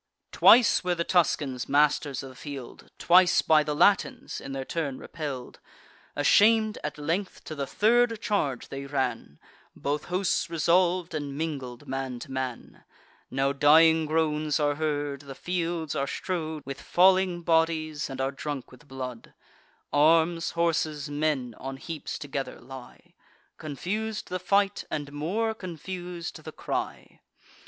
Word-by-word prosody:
Twice 235 -4 +6
were 180 -1 0
the 170 - -1
Tuscans 150 -8 +1
masters 145 -1 +2
of 135 - -8
the 130 - -14
field, 140 -3 -9
Twice 180 +1 +5
by 155 -1 +5
the 150 0 -2
Latins, 190 +5 +2
in 135 - -7
their 135 -1 -4
turn, 145 -5 -3
repell'd. 140 -6 -7 0.6
Asham'd 215 +8 +4
at 150 - -4
length, 170 +6 -3
to - - -7
the 140 -2 -4
third 230 - +3
charge 155 - -1
they 140 0 -6
ran; 135 - -2 0.4
Both 145 +1 -2
hosts 180 0 0
resolv'd, 175 +1 +2
and 145 -3 -4
mingled 140 -4 -5
man 135 -1 -3
to 125 - -9
man. 130 -2 -5 0.5
Now 135 +1 0
dying 160 +2 +5
groans 155 -1 0
are 145 -1 +2
heard; 145 -2 -2
the 140 -2 -10
fields 170 -2 -2
are 140 - -1
strow'd 160 -2 -4
With 135 0 -6
falling 185 -1 +3
bodies, 160 -2 +1
and 135 -1 -7
are 135 +1 0
drunk 140 -1 -6
with 130 +3 -17
blood. 130 -3 -7 0.6
Arms, 165 +3 +3
horses, 155 -3 0
men, 145 -5 -1
on 135 0 -6
heaps 160 +2 -6
together 140 -1 -5
lie: 130 0 -12 0.5
Confus'd 205 +9 -4
the 185 - -2
fight, 200 +2 +1
and 145 -2 -4
more 200 +10 -1
confus'd 180 -2 -7
the - - -7
cry. - - -5
155 Hz, 140 wpm, -27 LUFS, 140-175 Hz, 0.6 s, Twice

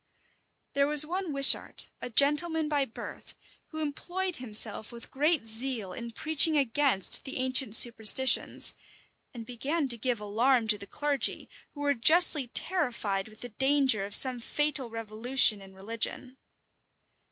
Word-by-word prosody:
There 280 0 0
was 300 0 +5
one 360 +1 -6
Wishart, 275 -1 +2
a - - -7
gentleman 300 +5 +1
by 290 -2 -2
birth, 225 - -12 0.3
who 315 -1 -7
employed 355 +5 -6
himself 220 -2 +1
with 235 0 -13
great 300 -1 -1
zeal 225 -3 -3
in 235 +4 -9
preaching 310 +5 +3
against 270 -6 -1
the 270 - -8
ancient 260 -3 0
superstitions, 235 +2 +4 0.6
and 235 -2 -11
began 275 +6 -4
to 235 -2 +1
give 245 0 -3
alarm 225 +3 -1
to 210 -1 0
the 200 - -11
clergy, 290 +4 -3 0.3
who 290 - -10
were 285 0 0
justly 305 +1 +4
terrified 235 - -3
with 215 0 -18
the 245 - -9
danger 265 -3 0
of 200 +1 +2
some 255 -2 +5
fatal 295 +1 -3
revolution 225 0 0
in 190 0 -16
religion. 230 +5 -6
260 Hz, 140 wpm, -26 LUFS, 225-290 Hz, 0.6 s, was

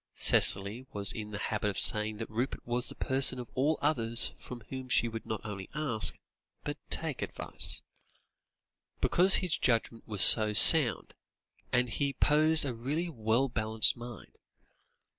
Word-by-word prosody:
Cicely 105 +7 -2
was 100 -1 -1
in 105 -1 -9
the 105 - -8
habit 105 0 -4
of 100 - -7
saying 105 0 +6
that 115 - -9
Rupert 120 +4 -6
was 120 +1 -4
the - - -10
person 130 -1 0
of 125 -2 -11
all 145 +4 -2
others 120 -5 +1
from 125 -1 -12
whom 130 -1 -9
she 120 - 0
would 115 -1 -10
not 110 -2 -6
only 100 -3 -10
ask, 140 -8 -1 0.5
but - - -8
take, - - -4
advice; - - 0 1.2
because 185 +2 +3
his 180 -4 -2
judgment 115 -1 -3
was 105 -3 -2
so 110 -1 +4
sound 135 +2 +7 0.6
and 125 0 -1
he 140 +4 -4
possessed 155 +3 +1
a 130 - -5
really 145 +9 -6
well 115 -1 -2
balanced 110 -2 0
mind. 120 -3 -13
120 Hz, 155 wpm, -28 LUFS, 110-135 Hz, 1.2 s, sound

